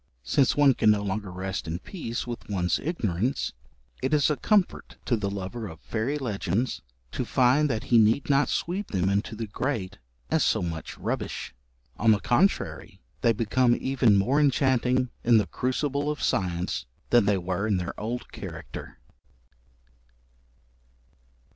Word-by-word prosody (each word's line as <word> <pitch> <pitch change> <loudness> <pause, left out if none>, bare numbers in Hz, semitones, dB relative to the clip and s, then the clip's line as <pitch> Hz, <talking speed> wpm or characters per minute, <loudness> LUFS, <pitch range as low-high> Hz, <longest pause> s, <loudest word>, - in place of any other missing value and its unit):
Since 125 - +2
one 145 -2 +6
can 110 - +3
no 105 -1 +3
longer 100 0 -3
rest 95 -1 -4
in 80 +1 -2
peace 120 - -5
with 120 -3 -7
one's 90 -4 0
ignorance, 125 - -1 0.5
it 135 +4 +2
is 150 0 +3
a - - +1
comfort 205 +4 0
to 120 - +2
the 105 -3 -2
lover 100 +3 -5
of 80 -3 -10
fairy 120 +6 -2
legends 115 - -2 0.3
to - - -2
find 130 +4 +3
that 110 -4 -1
he 115 - +8
need 110 +5 +3
not 140 0 +3
sweep 190 +4 -2
them 95 -1 0
into 100 +3 -1
the 115 +1 -4
grate 105 -3 -3 0.3
as 160 -3 +3
so - - +2
much 80 -2 -5
rubbish; - - -4 0.4
on 115 - +2
the 105 - +1
contrary 175 - 0 0.2
they 115 - +4
become 120 +3 +2
even 130 -5 +3
more 125 +9 +2
enchanting 130 -3 +2
in 115 -1 +5
the 105 - +3
crucible 140 +3 -1
of 150 -2 -3
science 90 -8 -1 0.2
than 120 -3 +5
they 100 -1 +3
were 90 +3 -2
in 105 -3 +2
their 90 -1 -3
old 120 +3 -4
character. - - -8
115 Hz, 155 wpm, -26 LUFS, 100-135 Hz, 0.5 s, he